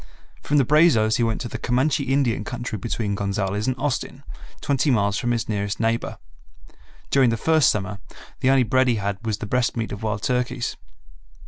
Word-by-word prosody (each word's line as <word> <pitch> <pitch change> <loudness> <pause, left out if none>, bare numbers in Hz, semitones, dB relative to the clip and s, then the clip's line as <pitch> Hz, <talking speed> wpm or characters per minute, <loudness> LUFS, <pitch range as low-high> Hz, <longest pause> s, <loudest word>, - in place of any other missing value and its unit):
From 145 - 0
the 135 - +4
Brazos 120 -7 +4
he 120 - +1
went 115 -1 -1
to 120 - -4
the - - -6
Comanche 135 +3 +1
Indian 135 -5 +1
country 120 +2 -5
between 110 0 -2
Gonzales 100 +1 -2
and 130 - +1
Austin, 140 -1 -3 0.4
twenty 140 +1 0
miles 100 -5 +2
from 120 - -2
his 115 -2 -1
nearest 100 -2 -2
neighbor. 115 -1 -1 0.9
During 135 -3 +4
the 115 - 0
first 160 +5 +3
summer, 100 0 -2 0.4
the 130 - +2
only 135 -1 +5
bread 130 +2 +2
he 120 - +3
had 100 0 -3
was 110 -2 -1
the 110 - -6
breast 125 +3 0
meat 115 -1 -2
of 100 - -6
wild 105 -1 -3
turkeys. 125 0 -1
115 Hz, 190 wpm, -23 LUFS, 105-130 Hz, 0.9 s, only